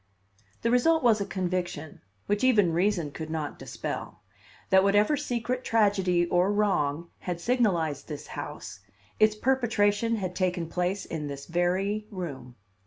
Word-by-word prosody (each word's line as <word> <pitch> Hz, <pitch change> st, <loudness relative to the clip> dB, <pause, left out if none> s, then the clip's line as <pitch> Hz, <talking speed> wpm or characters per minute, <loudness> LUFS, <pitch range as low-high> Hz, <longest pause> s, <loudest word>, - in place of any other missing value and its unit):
The 230 Hz, -, +2 dB
result 320 Hz, +6 st, +3 dB
was 225 Hz, -4 st, +4 dB
a 200 Hz, -, -2 dB
conviction, 175 Hz, -5 st, -3 dB, 0.2 s
which 205 Hz, +2 st, 0 dB
even 210 Hz, -10 st, +4 dB
reason 175 Hz, -3 st, +1 dB
could 155 Hz, +2 st, -7 dB
not 155 Hz, -2 st, -4 dB
dispel, -, -, -6 dB, 0.5 s
that 190 Hz, 0 st, +6 dB
whatever 205 Hz, +8 st, +4 dB
secret 250 Hz, -3 st, -2 dB
tragedy 195 Hz, -6 st, +2 dB
or 180 Hz, +3 st, +2 dB
wrong 170 Hz, -6 st, 0 dB
had 175 Hz, -2 st, -4 dB
signalized 175 Hz, -, 0 dB
this 150 Hz, -2 st, -6 dB
house, -, -, -7 dB, 0.4 s
its 215 Hz, 0 st, +5 dB
perpetration 230 Hz, -3 st, +1 dB
had 185 Hz, -4 st, -4 dB
taken 180 Hz, -3 st, 0 dB
place 180 Hz, +3 st, -1 dB
in 150 Hz, -2 st, -4 dB
this 140 Hz, -1 st, -7 dB
very 190 Hz, +5 st, 0 dB
room. 145 Hz, -, -7 dB
190 Hz, 140 wpm, -27 LUFS, 170-215 Hz, 0.5 s, that